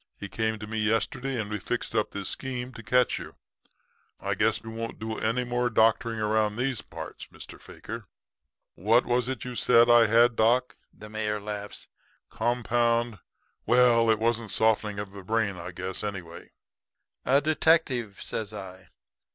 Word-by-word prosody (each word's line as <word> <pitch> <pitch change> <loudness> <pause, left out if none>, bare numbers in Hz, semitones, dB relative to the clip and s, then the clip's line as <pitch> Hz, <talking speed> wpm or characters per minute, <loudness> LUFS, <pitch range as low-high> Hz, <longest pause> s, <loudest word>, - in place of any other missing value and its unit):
He 100 - -6
came 110 +2 -1
to 105 - -7
me 110 +1 -4
yesterday 115 +4 0
and 105 - -2
we 105 0 -3
fixed 120 +5 -3
up 110 -2 +1
this 100 -1 -5
scheme 125 -1 -4
to 115 - -9
catch 125 +2 +2
you. - - -10 0.8
I - - -1
guess - - +1
you 115 - -7
won't 115 0 -5
do 110 0 -4
any 115 +3 0
more 120 0 0
doctoring 115 0 +2
around 105 0 +1
these 125 +1 -1
parts, - - -9
Mr. - - -12
Fakir. - - -9 0.7
What 115 +7 +3
was 125 0 +1
it 130 - -4
you 125 -1 -5
said 120 0 +5
I 120 -1 +7
had, 115 +2 +5
doc?' 120 +3 +2 0.2
the 110 - -12
mayor 105 0 -2
laughs, 105 0 -6 0.4
'compound 120 -2 +1 0.5
well, 120 -1 +5
it 110 - +4
wasn't 115 0 0
softening 110 -1 +1
of 105 -1 -5
the 100 0 -9
brain, 110 0 0
I 85 +1 -6
guess, 95 +2 -5
anyway.' 90 -5 -6 0.7
"'A 140 +2 +4
detective,' 145 -8 +2
says 110 -2 -4
I. 95 -3 -9
115 Hz, 165 wpm, -27 LUFS, 105-120 Hz, 0.8 s, I